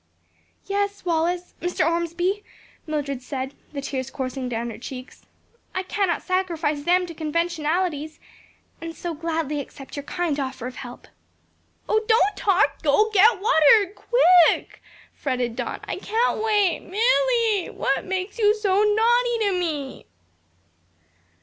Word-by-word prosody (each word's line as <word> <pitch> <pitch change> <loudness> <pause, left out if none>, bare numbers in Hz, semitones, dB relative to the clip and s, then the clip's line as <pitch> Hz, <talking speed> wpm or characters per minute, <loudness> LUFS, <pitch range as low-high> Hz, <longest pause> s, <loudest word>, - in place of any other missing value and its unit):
"Yes, 405 -1 -2
Wallace, 345 +1 -1
Mr. 355 -2 0
Ormsby," 345 +4 -1 0.4
Mildred 285 -4 -3
said, 265 +1 -5 0.2
the 285 -2 -5
tears 265 -1 -4
coursing 260 -1 -4
down 235 0 -3
her - - -10
cheeks, 255 +1 -9 0.5
"I 375 - -1
cannot 375 -2 -1
sacrifice 335 -6 -1
them 360 +1 +3
to 340 - -8
conventionalities, 315 0 -1 0.6
and 330 0 -6
so 345 -2 -4
gladly 320 -2 -2
accept 275 0 -9
your 285 - -4
kind 310 0 -2
offer 260 -2 -4
of 255 0 -7
help." 245 -1 -9 0.8
"Oh, 435 0 +2
don't 430 -3 +3
talk! 395 0 +2
go 425 +9 +3
get 420 +1 +5
water, 400 -1 +5
quick!" 365 -9 +4 0.3
fretted 250 -4 -2
Don, 245 0 -4
"I - - -4
can't 450 +1 0
wait, 415 -5 +2
Milly, 460 -1 +1
what - - -1
makes 380 +4 -4
you 420 -1 +4
so 405 -2 +2
naughty 470 +3 +3
to 405 -2 +2
me?" 310 - -3
345 Hz, 130 wpm, -23 LUFS, 290-405 Hz, 0.8 s, get